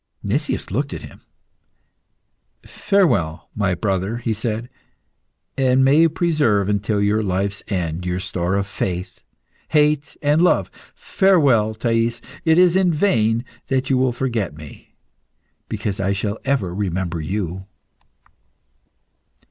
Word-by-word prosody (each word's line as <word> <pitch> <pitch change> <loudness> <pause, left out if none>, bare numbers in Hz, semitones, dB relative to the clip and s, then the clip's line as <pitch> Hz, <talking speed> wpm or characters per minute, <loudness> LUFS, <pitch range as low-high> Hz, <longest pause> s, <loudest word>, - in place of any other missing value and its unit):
Nicias - - -1
looked - - -2
at - - -8
him. - - -12 1.4
"Farewell, 120 - 0
my 100 -4 0
brother," 95 +3 -1
he 120 -2 -2
said, 110 +2 -3 0.9
"and 130 -1 +3
may 140 +3 +5
you 165 - +5
preserve 150 - +1
until 105 +1 0
your 105 +2 +2
life's 100 0 -1
end 90 -3 -2
your 90 0 -2
store 90 0 -1
of 100 0 0
faith, 90 -2 -4 0.5
hate, 150 -1 +1
and 145 +3 +3
love. 180 - +2 0.2
Farewell, 140 - +3
Thais! 115 +1 0 0.3
It 160 0 +4
is 180 -1 +5
in 190 -2 +3
vain 120 - +1 0.2
that 135 0 0
you 130 - +3
will 130 -1 +2
forget 115 - -2
me, 75 -2 -13 0.7
because 100 -2 -3
I 100 0 +1
shall 100 +2 -3
ever 130 -11 0
remember 90 -3 -2
you." 95 +2 -4
110 Hz, 125 wpm, -21 LUFS, 95-135 Hz, 1.4 s, may